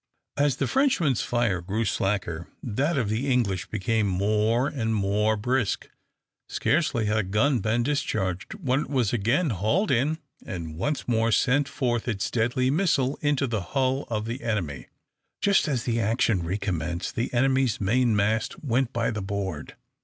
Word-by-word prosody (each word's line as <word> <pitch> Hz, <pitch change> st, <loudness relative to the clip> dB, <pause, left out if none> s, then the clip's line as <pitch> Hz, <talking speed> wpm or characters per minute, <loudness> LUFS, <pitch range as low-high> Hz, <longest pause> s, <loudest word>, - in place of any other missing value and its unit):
As 145 Hz, -2 st, +2 dB
the -, -, -1 dB
Frenchmen's 200 Hz, -, +2 dB
fire 115 Hz, -7 st, 0 dB
grew 105 Hz, +6 st, -2 dB
slacker, 90 Hz, -5 st, -1 dB, 0.2 s
that 140 Hz, +8 st, 0 dB
of 120 Hz, -5 st, +1 dB
the 115 Hz, +7 st, -1 dB
English 100 Hz, -8 st, 0 dB
became 110 Hz, +1 st, 0 dB
more 105 Hz, +6 st, +1 dB
and 110 Hz, -6 st, -1 dB
more 105 Hz, +2 st, +1 dB
brisk. 120 Hz, 0 st, -1 dB, 0.6 s
Scarcely 140 Hz, -7 st, +1 dB
had 105 Hz, +1 st, +1 dB
a -, -, +3 dB
gun 110 Hz, +8 st, +1 dB
been 110 Hz, +4 st, +1 dB
discharged 95 Hz, -10 st, -2 dB
when 130 Hz, +1 st, 0 dB
it -, -, -4 dB
was 125 Hz, -7 st, +1 dB
again 120 Hz, -, +1 dB
hauled 110 Hz, -, +1 dB
in 140 Hz, +5 st, +2 dB, 0.3 s
and 85 Hz, -4 st, -6 dB
once 140 Hz, -, -2 dB
more 115 Hz, -1 st, +2 dB
sent 135 Hz, +5 st, +2 dB
forth 120 Hz, -3 st, -1 dB
its 100 Hz, -5 st, -1 dB
deadly 125 Hz, +2 st, +1 dB
missile 145 Hz, -5 st, +1 dB
into 145 Hz, -2 st, +1 dB
the 115 Hz, -5 st, -1 dB
hull 130 Hz, +7 st, -1 dB
of 110 Hz, -2 st, -2 dB
the 120 Hz, +3 st, -4 dB
enemy. 85 Hz, -, -3 dB, 0.5 s
Just 200 Hz, -4 st, +3 dB
as 130 Hz, -6 st, -1 dB
the 115 Hz, -1 st, 0 dB
action 110 Hz, -2 st, +1 dB
re 85 Hz, +4 st, -2 dB
commenced, 85 Hz, -3 st, -3 dB
the 115 Hz, -, -2 dB
enemy's 130 Hz, -1 st, +2 dB
main 115 Hz, +3 st, +2 dB
mast 110 Hz, +6 st, 0 dB
went 130 Hz, -2 st, +1 dB
by 115 Hz, -1 st, 0 dB
the 105 Hz, -1 st, -3 dB
board. 95 Hz, -6 st, -4 dB
115 Hz, 165 wpm, -26 LUFS, 100-130 Hz, 0.6 s, a